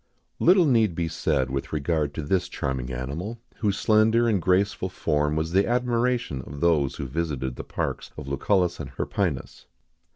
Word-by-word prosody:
Little 180 0 +6
need 115 - +3
be 85 -1 -1
said 70 -4 0
with 70 0 -3
regard 75 -1 -1
to 80 - -3
this 90 +4 0
charming 65 -1 -3
animal, 75 - -4 0.2
whose 100 -3 0
slender 110 +4 +4
and 105 -5 +2
graceful 95 +2 +1
form 75 -4 0
was 80 +1 -1
the 95 +2 +3
admiration 120 - 0
of 70 0 -8
those 75 -5 +2
who - - -5
visited 65 -3 -2
the - - -6
parks - - -3
of 75 -3 -7
Lucullus 90 +5 +1
and 75 -4 -5
Hirpinus. 75 +3 -3
85 Hz, 165 wpm, -25 LUFS, 70-105 Hz, 0.2 s, Little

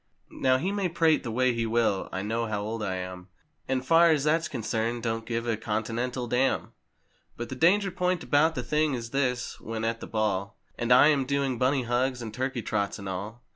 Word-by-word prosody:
Now 130 -1 +3
he 180 +9 -1
may 200 -3 -1
prate 165 -2 +3
the 120 - -5
way 125 +2 +2
he 115 -1 -1
will, 110 -4 +1
I 95 - -3
know 115 +2 -1
how 105 -1 -2
old 110 +1 -4
I 95 -3 -2
am, 90 0 -6 0.4
And 130 0 -1
far 165 +3 +6
as 150 -4 +3
that's 165 +3 +2
concerned 115 -2 -2
don't 115 -1 -2
give 115 0 -2
a 115 - +1
Continental 115 +4 -2
dam. 125 +3 0 0.7
But 120 - -5
the 130 - -5
danger 190 +7 +3
point 180 -2 0
about 145 +6 +3
the 125 - -3
thing 150 +3 +1
is 115 -1 -6
this: 125 -3 -1
when 110 0 -4
at 115 0 -1
the - - -8
ball 105 -2 -1 0.2
And 120 +1 -2
I 125 +4 +8
am 140 -3 +2
doing 140 -3 0
"Bunny 130 +1 +2
hugs" 125 +2 0
and 110 -3 -6
"Turkey 130 0 -2
trots" 100 -1 -1
and 100 -2 -8
all. 105 +6 -6
120 Hz, 210 wpm, -27 LUFS, 110-140 Hz, 0.7 s, I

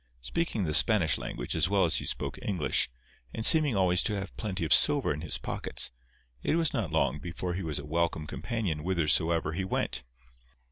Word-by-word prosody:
Speaking 110 - -3
the 75 -3 -2
Spanish 95 -4 +3
language - - -5
as - - +1
well - - +2
as - - +1
he - - -3
spoke - - -4
English, 90 -11 +1 0.5
and 110 - 0
seeming 150 -7 +7
always 90 -2 +3
to 105 - -1
have 95 -1 -7
plenty 95 -6 -4
of 80 - +4
silver 145 - +5
in 75 - -7
his 85 - -1
pockets, - - -2 0.5
it - - -1
was 165 -2 0
not 110 - -3
long 75 -3 0
before 90 +2 -5
he 95 - -4
was 80 -4 -3
a 70 - -6
welcome 80 0 -2
companion 100 -3 -4
whithersoever 80 -1 0
he 90 +4 -3
went. 95 - -2
90 Hz, 190 wpm, -28 LUFS, 80-105 Hz, 0.5 s, seeming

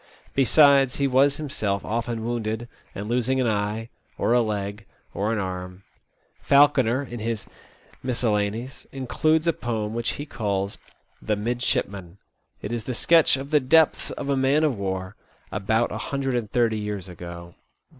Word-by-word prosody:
Besides, 140 -1 +5
he 140 - 0
was 135 +2 +3
himself 105 -10 -2
often 115 0 -2
wounded 115 -1 -2 0.3
and 100 +1 -5
losing 125 +3 +1
an 130 - +2
eye, 105 +1 -1 0.3
or 115 - +1
a 120 - +5
leg, 100 -2 -3 0.3
or 105 +3 -1
an 115 - 0
arm. 90 -1 -5 0.6
Falconer, 140 -3 +4
in 120 -3 -7
his 115 0 -3 0.3
" - - -28
Miscellanies,'* 115 -1 -1
includes 155 +5 +1
a 170 - +3
poem 110 -4 -3
which 115 0 -1
he 145 - -6
calls 100 -7 -2 0.2
" - - -40
The 105 - 0
Midshipman." 100 -5 -2 0.5
It 105 - -4
is 120 -2 -3
the 125 - -3
sketch 165 +1 +4
of 135 +2 -7
the 150 - +5
depths 155 +4 +3
of 140 - -5
a 140 - +2
man 135 +3 +3
of 150 -5 +2
war, 95 0 -4 0.3
about 110 +3 0
a - - -4
hundred 135 -2 -2
and 120 -4 -1
thirty 115 -3 +2
years 105 -3 -4
ago. 85 -1 -9
115 Hz, 165 wpm, -24 LUFS, 105-135 Hz, 0.6 s, Besides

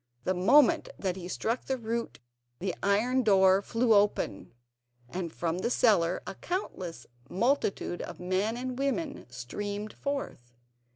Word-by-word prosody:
The 185 - +1
moment 240 +10 +5
that 185 -3 -2
he 180 -2 -7
struck 230 +6 -2
the 265 - -1
root 230 0 -3 0.4
the 185 0 -2
iron 225 +6 +2
door 190 -3 +5
flew 230 +2 +2
open, 200 - +1 0.6
and 175 +4 -4
from 170 +1 -2
the 235 - 0
cellar 190 -9 +3
a - - -5
countless 185 - -5 0.2
multitude 200 -4 0
of - - -7
men 190 +5 0
and 255 0 -4
women 280 +2 -2
streamed 205 - -5
forth. 275 - -5
205 Hz, 135 wpm, -29 LUFS, 180-245 Hz, 0.6 s, moment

